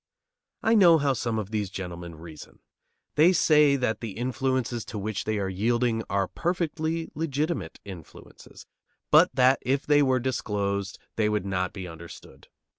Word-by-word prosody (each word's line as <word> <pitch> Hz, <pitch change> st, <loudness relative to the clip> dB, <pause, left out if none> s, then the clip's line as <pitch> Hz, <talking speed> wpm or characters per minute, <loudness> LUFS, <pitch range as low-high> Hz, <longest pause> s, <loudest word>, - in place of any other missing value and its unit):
I 225 Hz, -, +3 dB
know 180 Hz, -7 st, +7 dB
how 140 Hz, -2 st, +1 dB
some 115 Hz, -3 st, -2 dB
of 105 Hz, -1 st, -4 dB
these 105 Hz, -3 st, -2 dB
gentlemen 85 Hz, -3 st, -7 dB
reason. 80 Hz, -1 st, -12 dB, 0.6 s
They 165 Hz, +5 st, +5 dB
say 150 Hz, -4 st, +4 dB
that 125 Hz, -5 st, -1 dB
the 115 Hz, -4 st, -5 dB
influences 125 Hz, 0 st, -2 dB
to 110 Hz, -, -7 dB
which 105 Hz, 0 st, -3 dB
they 110 Hz, 0 st, -1 dB
are 100 Hz, -1 st, -1 dB
yielding 115 Hz, +4 st, 0 dB
are 100 Hz, -1 st, 0 dB
perfectly 165 Hz, -, -2 dB
legitimate 150 Hz, -, -3 dB
influences, 90 Hz, -7 st, -12 dB, 0.5 s
but -, -, +7 dB
that 130 Hz, +1 st, +4 dB
if 135 Hz, +2 st, -1 dB
they 145 Hz, 0 st, +4 dB
were 130 Hz, -2 st, +2 dB
disclosed 100 Hz, -6 st, -2 dB, 0.2 s
they 105 Hz, -1 st, +2 dB
would 105 Hz, -2 st, -1 dB
not 90 Hz, -2 st, -1 dB
be 95 Hz, -3 st, -7 dB
understood. 85 Hz, 0 st, -12 dB
115 Hz, 155 wpm, -26 LUFS, 100-140 Hz, 0.6 s, know